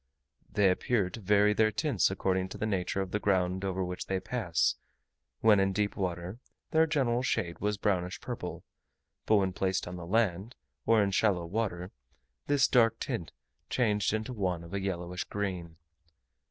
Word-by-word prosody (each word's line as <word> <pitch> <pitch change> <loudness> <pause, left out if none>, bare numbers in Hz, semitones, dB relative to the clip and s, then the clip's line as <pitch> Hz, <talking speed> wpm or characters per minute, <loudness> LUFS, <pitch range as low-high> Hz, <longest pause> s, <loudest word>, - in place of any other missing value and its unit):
They 100 -3 +4
appear 95 -1 0
to 115 - -7
vary 105 +1 +4
their 110 0 +3
tints 135 - +1
according 95 -1 -1
to - - -7
the - - -2
nature 95 -2 -1
of 95 -1 -4
the 105 - 0
ground 95 -2 +1
over 95 -1 -1
which 90 0 -5
they 95 -1 0
pass: 95 -4 0 0.7
when 110 -2 +6
in 95 0 +2
deep 105 +1 0
water, 90 +3 -3 0.3
their 160 0 +4
general 130 -6 +1
shade 100 -9 -1
was 105 0 -1
brownish 95 -3 -1
purple, - - -6 0.6
but 110 - +5
when 95 -2 +2
placed 95 -1 -1
on 90 0 -6
the 85 -1 -8
land, 105 +2 0 0.3
or 110 -2 +5
in 100 - 0
shallow 95 -3 +2
water, 90 -1 -3 0.6
this 145 -2 +4
dark 115 -3 +3
tint - - -4 0.4
changed 105 -5 +1
into 110 +3 -2
one 90 -6 -2
of 85 +3 -11
a 100 - -1
yellowish 90 -2 -3
green. 90 -5 -4
100 Hz, 170 wpm, -30 LUFS, 90-110 Hz, 0.7 s, when